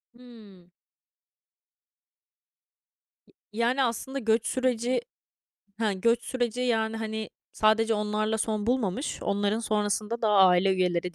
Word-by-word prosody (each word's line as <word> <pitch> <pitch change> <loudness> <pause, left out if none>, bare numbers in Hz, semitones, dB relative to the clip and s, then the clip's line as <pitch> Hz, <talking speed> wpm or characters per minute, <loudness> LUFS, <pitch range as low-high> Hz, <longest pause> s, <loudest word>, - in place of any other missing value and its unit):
Hımm. 215 -8 -16 2.6
Y - - -26 0.3
yani 250 +3 +2
aslında 265 +3 -3
göç 225 -1 +1
süreci 255 - 0 0.8
he, 215 -3 +1
göç 230 +5 +1
süreci, 245 -1 -2
yani, 225 -2 0
hani, 220 -1 -4 0.2
sadece 220 +1 +2
onlarla 215 +1 -1
son 215 -1 -2
bulmamış, 245 0 -1
onların 205 +2 0
sonrasında 215 +1 -1
da 220 - +2
aile 190 -2 +5
üyeleri, 180 -1 -1
220 Hz, 110 wpm, -27 LUFS, 205-235 Hz, 2.6 s, aile